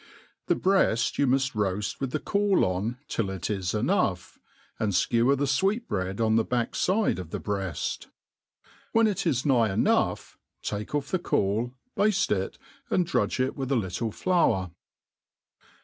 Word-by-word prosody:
The - - +3
MeafTyoii 145 - +2
muft 130 +1 +1
roaft 100 -2 -1
with 135 - -2
the 155 - -2
cauloil 125 - +1
till 105 -4 -1
it 95 +1 -3
is 95 -2 -2
enough 105 - 0 0.2
\ - - -33
and 105 -2 0
Ikewer 120 +8 +3
the 140 - +1
lweecbreac| 135 - 0
on 110 0 +3
ihe - - +2
backfide 180 - +1
of 90 -4 -7
the'breafr. 95 -1 -3 0.9
When 225 0 +5
It 210 -4 0
is 130 +1 0
nigh 120 -7 +3
enough, 95 - 0 0.2
take 105 +7 -3
off 145 -1 -2
the 185 - +1
caul, 115 - 0 0.2
bafte 205 - +2 0.2
itj - - -22 0.3
airf 180 - +2
drudge 165 - 0
it 130 +1 0
with 135 -1 -4
a - - +3
link 110 +1 -2
flour. 130 - +1
120 Hz, 150 wpm, -27 LUFS, 100-150 Hz, 0.9 s, When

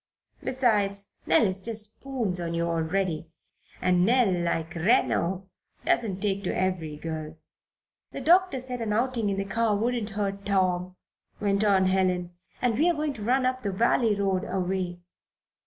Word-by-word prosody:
Besides, 205 -6 +1 0.2
Nell - - +5
is 190 -1 -1
just 215 -1 +1
spoons 235 -10 -2
on 170 0 -3
you 170 0 0
already, 165 0 -1 0.5
and 180 -1 +3
Nell, 235 0 +4
like 170 -1 -1
Reno, 185 -1 +1 0.4
doesn't 200 -5 +1
take 200 -1 -1
to - - 0
every 175 -5 -1
girl." 155 0 -6 0.7
"The - - -6
doctor 360 -4 +4
said 250 -1 -4
an 215 -2 -1
outing 235 -1 0
in 195 - -1
the 195 - -1
car 220 +2 +1
wouldn't 230 0 -1
hurt 200 -1 -2
Tom," 185 -2 0 0.4
went 200 0 +1
on 195 -3 +4
Helen, 185 -2 +1 0.3
"and 240 -1 +1
we're 340 +2 +3
going 300 -1 -1
to 220 - -10
run 255 +4 +2
up 255 0 0
the 200 - -2
valley 225 +2 +2
road 195 -2 0
a 190 - -2
way. 180 -1 -2
195 Hz, 160 wpm, -27 LUFS, 180-230 Hz, 0.7 s, Nell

